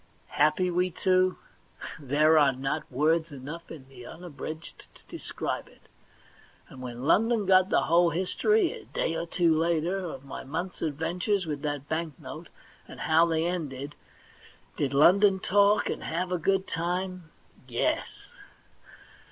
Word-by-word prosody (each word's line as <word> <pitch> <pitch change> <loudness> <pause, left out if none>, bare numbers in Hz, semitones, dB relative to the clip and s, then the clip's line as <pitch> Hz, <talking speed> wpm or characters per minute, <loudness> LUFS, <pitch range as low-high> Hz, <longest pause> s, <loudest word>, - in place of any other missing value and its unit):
Happy, 155 +5 +2
we 180 +1 +1
too? 185 +1 +2 0.6
There 150 +3 +4
are 140 -2 +4
not 135 +4 -3
words 160 +5 +1
enough 145 +5 -8
in 140 -5 -10
the 130 -2 -13
unabridged 160 +2 -9
to - - -18
describe - - -5
it. - - -21 0.9
And 130 - -11
when 125 -1 -7
London 220 - +3
got 185 0 +5
the - - +3
whole 170 +1 +4
history, 335 - +1
a 455 -4 -10
day 165 - -2
or 170 +1 -3
two 165 -1 +2
later, 170 +3 +1
of 160 -7 -7
my 135 - -7
month's 165 +7 -5
adventures 170 +6 -1
with 150 -3 -4
that 145 -2 -3
bank 160 -1 -3
note, - - -9 0.4
and - - -10
how 160 +1 +4
they 165 0 0
ended, 150 -5 -4 0.8
did 140 - -1
London 190 +6 +5
talk, 205 +2 +3
and - - -3
have 180 +3 -2
a 180 - 0
good 190 +3 +1
time? 180 +1 -3 0.4
Yes. - - -2
165 Hz, 145 wpm, -28 LUFS, 150-185 Hz, 0.9 s, got